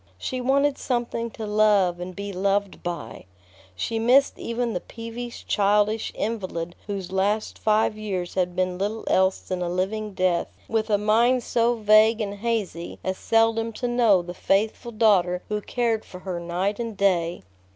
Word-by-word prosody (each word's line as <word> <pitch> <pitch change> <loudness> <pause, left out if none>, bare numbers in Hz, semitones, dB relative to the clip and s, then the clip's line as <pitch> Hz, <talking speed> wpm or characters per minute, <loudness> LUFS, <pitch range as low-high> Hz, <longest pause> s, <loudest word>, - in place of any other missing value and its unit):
She 255 - -4
wanted 275 +2 +2
something 235 -2 -2
to 220 - -4
love 205 -4 +3
and 180 +1 -6
be 200 0 -5
loved 200 +1 0
by. 170 -11 -6 0.5
She 225 - -2
missed 255 +5 +4
even 235 0 -2
the 180 - -1
peevish, 235 +3 -8
childish 210 +1 +2
invalid 185 -6 -3
whose 195 -3 -4
last 205 +3 0
five 215 0 +2
years 195 -5 -4
had 180 -1 -1
been 185 0 -1
little 210 +3 -2
else 190 0 +2
than 185 -1 -4
a 175 - -1
living 200 +3 -2
death, 185 -2 0
with 220 0 -1
a 205 - +4
mind 235 +4 +3
so 235 0 +1
vague 215 +1 +5
and 205 -2 -2
hazy 205 -7 -2
as 190 0 -2
seldom 225 0 +2
to 245 - -3
know 230 -7 +3
the 175 0 -7
faithful 215 +6 0
daughter 195 -5 +3
who 210 0 -1
cared 230 -1 -1
for 180 - -11
her 185 -2 -4
night 180 +5 -2
and 230 -3 -4
day. 175 - +1
210 Hz, 165 wpm, -24 LUFS, 185-225 Hz, 0.5 s, vague